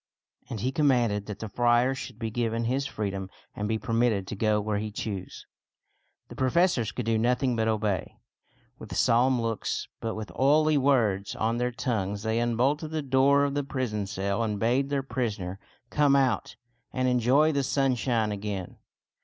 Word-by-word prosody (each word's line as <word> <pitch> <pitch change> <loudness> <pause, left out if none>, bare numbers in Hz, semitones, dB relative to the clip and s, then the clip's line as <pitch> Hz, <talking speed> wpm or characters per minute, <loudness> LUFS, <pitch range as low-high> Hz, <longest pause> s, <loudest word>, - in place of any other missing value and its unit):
And 110 - -5
he 130 - 0
commanded 120 -8 +2
that 105 -2 -5
the 110 - -6
friar 120 +4 +2
should 130 - -7
be 115 -1 -4
given 115 0 -1
his 130 +4 0
freedom 100 -4 -4 0.3
and 105 - -2
be 110 +1 0
permitted 115 -3 +1
to 105 - -6
go 105 +1 +2
where 105 0 -1
he 105 +1 -3
chose. 100 -3 -6 0.8
The - - -11
professors 130 - +2
could 125 +3 -4
do 115 -1 +1
nothing 125 +2 +1
but 110 -1 0
obey. 105 -4 -1 0.6
With - - -7
solemn 125 +2 +3
looks, 115 -2 -2
but 115 -1 -3
with 110 -1 -6
oily 155 +3 +4
words 120 -8 +2
on 115 +2 0
their 125 0 0
tongues, 105 -5 -2
they 110 +1 0
unbolted 130 +7 +1
the 155 -1 -3
door 140 +1 +4
of 140 -1 0
the 145 0 -1
prison 125 -7 -3
cell 100 +1 -2
and 105 -3 -1
bade 125 +5 +1
their 140 -1 0
prisoner 105 -8 -3 0.3
come 145 -2 +4
out 135 -2 +1 0.4
and 130 0 0
enjoy 130 +5 +3
the 140 -2 +1
sunshine 125 -5 +1
again. 100 -3 -5
115 Hz, 170 wpm, -27 LUFS, 105-130 Hz, 0.8 s, oily